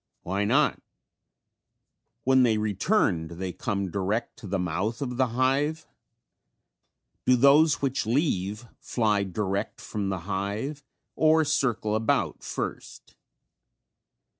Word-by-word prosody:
Why 100 +3 -1
not? 135 +7 +2 1.4
When 130 0 +4
they 115 -3 +3
return 105 - +1
do 85 - -10
they 90 +1 -4
come 100 -4 -3
direct 100 +5 -2
to 110 - -9
the 95 +1 -1
mouth 95 +6 -2
of 125 -4 -4
the 130 -1 +3
hive? 135 +6 0 1.4
Do 125 - +6
those 140 +4 +5
which 135 -4 0
leave 110 - 0
fly 105 -4 +1
direct 100 +2 -3
from 100 -3 -4
the 95 -3 -3
hive 100 - -3 0.3
or 160 0 +4
circle 125 -8 0
about 110 0 0
first? - - -6
110 Hz, 115 wpm, -26 LUFS, 100-135 Hz, 1.4 s, Do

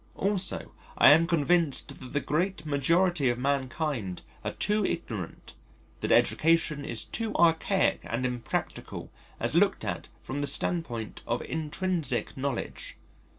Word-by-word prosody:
Also 195 -1 0 0.2
I - - +8
am 165 +3 +6
convinced 165 -2 +2
that 130 - -10
the 145 - +1
great 165 +2 -1
majority 155 +1 +2
of 120 - 0
mankind 130 - -2 0.2
are - - -3
too 210 0 +1
ignorant, 115 - -4 0.5
that - - -2
education 160 -2 +3
is 115 - -2
too 225 -1 -3
archaic 170 +3 +3
and 120 +2 -2
impractical 125 -2 -4 0.3
as - - 0
looked - - +2
at - - -4 0.2
from 135 +4 -4
the 145 - 0
standpoint 140 - -2
of 120 - -1
intrinsic 165 +1 -1
knowledge. 135 -2 -4
150 Hz, 130 wpm, -28 LUFS, 130-170 Hz, 0.5 s, I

